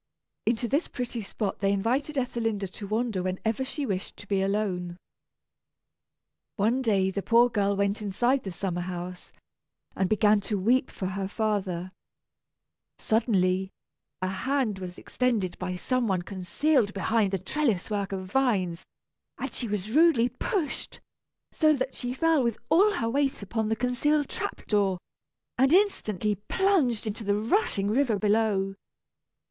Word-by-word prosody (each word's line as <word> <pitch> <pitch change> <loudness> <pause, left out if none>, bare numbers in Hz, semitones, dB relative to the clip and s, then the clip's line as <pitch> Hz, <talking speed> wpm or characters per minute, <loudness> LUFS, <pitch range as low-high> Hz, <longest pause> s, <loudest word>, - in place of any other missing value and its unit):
Into 235 +1 +1
this 285 +7 +1
pretty 245 -2 -4
spot 200 0 -3
they 195 0 +2
invited 255 +9 0
Ethelinda 225 -5 -1
to 200 - -8
wander 220 -2 -1
when 185 0 -2
ever 225 +4 0
she 280 +2 -4
wished 195 -5 -3
to 205 - -12
be 195 -1 +1
alone. 190 -3 -1 1.6
One 230 +5 +2
day 195 -6 +2
the 200 - -2
poor 235 +4 +5
girl 200 -2 +1
went 200 +1 0
inside 240 +7 +1
the 195 - -6
summer 175 0 -3
house, 180 0 -6 0.6
and 190 -1 0
began 215 -1 +4
to 205 +1 -2
weep 245 +7 +2
for 190 - -6
her 190 +1 -2
father. 195 -4 -2 1.1
Suddenly, 190 -4 +1 0.5
a - - +1
hand 225 +1 -1
was 180 -1 -7
extended 220 -8 -1
by 180 0 -3
some 250 +6 0
one 185 -3 0
concealed 205 - 0
behind 215 +1 +2
the 195 - 0
trellis 215 - -1
work 200 -1 -1
of 190 -1 -4
vines, 190 -7 0 0.5
and - - -5
she 240 - -3
was 210 0 -3
rudely 295 -5 +5
pushed, 305 - -3 0.5
so 310 -1 +4
that 260 -2 -2
she 245 0 -4
fell 325 0 +3
with 235 -2 0
all 400 +6 +5
her 230 - -1
weight 275 -1 0
upon 220 +2 -2
the 225 - +1
concealed 275 +5 +1
trap - - -5
door, 200 -3 +2 0.6
and 265 +2 +5
instantly 215 - +2
plunged 255 - +1
into 215 +1 -4
the 200 0 +1
rushing 220 - +1
river 235 0 +2
below. 205 -2 +1
215 Hz, 150 wpm, -27 LUFS, 195-250 Hz, 1.6 s, poor